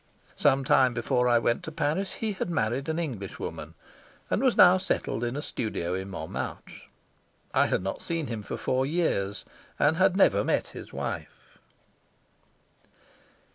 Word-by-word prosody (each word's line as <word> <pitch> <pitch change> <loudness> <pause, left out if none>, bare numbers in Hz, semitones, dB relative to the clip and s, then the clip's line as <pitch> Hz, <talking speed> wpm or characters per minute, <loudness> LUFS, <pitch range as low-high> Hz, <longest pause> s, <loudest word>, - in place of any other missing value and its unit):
Some 135 -1 +3
time 130 -1 +4
before 125 +1 +1
I 120 - +5
went 120 0 +1
to 160 - -7
Paris 165 +5 -1
he 220 -1 -2
had 185 - -3
married 135 -1 -1
an 160 - -1
Englishwoman, 120 - -5 0.6
and - - +1
was 260 -3 +2
now 185 +1 +8
settled 185 -9 -2
in 120 +1 -2
a 145 - -3
studio 100 - -3
in 95 +1 -4
Montmartre. 80 -4 -6 0.6
I - - +4
had - - 0
not 95 - -3
seen 165 -2 -2
him 115 -5 -4
for - - -5
four 130 0 0
years, 135 - -1 0.3
and 155 +2 +3
had 190 0 +3
never 200 - +4
met - - 0
his - - -10
wife. - - -6
135 Hz, 155 wpm, -27 LUFS, 115-170 Hz, 0.6 s, now